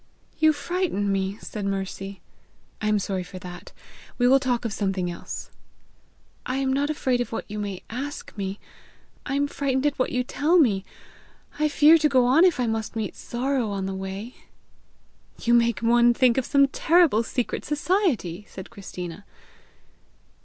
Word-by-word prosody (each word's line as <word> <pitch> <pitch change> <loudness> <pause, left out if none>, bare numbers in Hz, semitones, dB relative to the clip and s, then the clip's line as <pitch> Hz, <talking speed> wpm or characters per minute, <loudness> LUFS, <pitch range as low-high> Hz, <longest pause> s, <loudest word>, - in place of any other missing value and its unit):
"You 315 0 +6
frighten 300 - -1
me!" 195 +1 -1
said 210 - -6
Mercy. 195 0 -4 0.6
"I 215 - -1
am 210 0 +3
sorry 195 -1 -2
for 180 +1 -9
that. 180 -1 -9 0.5
We 245 - +3
will 270 +2 +6
talk 250 -3 -1
of 225 - -2
something 190 -3 -1
else." 170 - -7 0.9
"I 255 - -3
am 265 -1 0
not 285 +2 0
afraid 260 -5 0
of 245 - -4
what 225 - -4
you 210 0 -5
may 200 -3 -5
ask 275 +5 -6
me; 195 -1 -4 0.7
I 275 - -1
am 285 +1 +2
frightened 275 -1 -1
at 290 -2 0
what 255 - +1
you 250 0 0
tell 300 +7 +2
me. 210 - +3 0.8
I 305 - +3
fear 305 +2 +6
to 305 -1 +3
go 255 -3 +4
on 270 +7 +5
if 355 -7 +3
I 250 - +2
must 225 0 -2
meet 220 -3 -3
Sorrow 250 -1 -2
on 195 -1 -3
the 195 - -3
way!" 195 +5 -6 1.0
"You 235 - +1
make 235 -1 +3
one 240 +1 +4
think 255 -1 +4
of 260 - -4
some 280 -1 +4
terrible 320 -6 +4
secret 240 +1 -3
society!" 290 - 0
said 190 - -10
Christina. 185 -3 -8
240 Hz, 170 wpm, -25 LUFS, 200-280 Hz, 1.0 s, You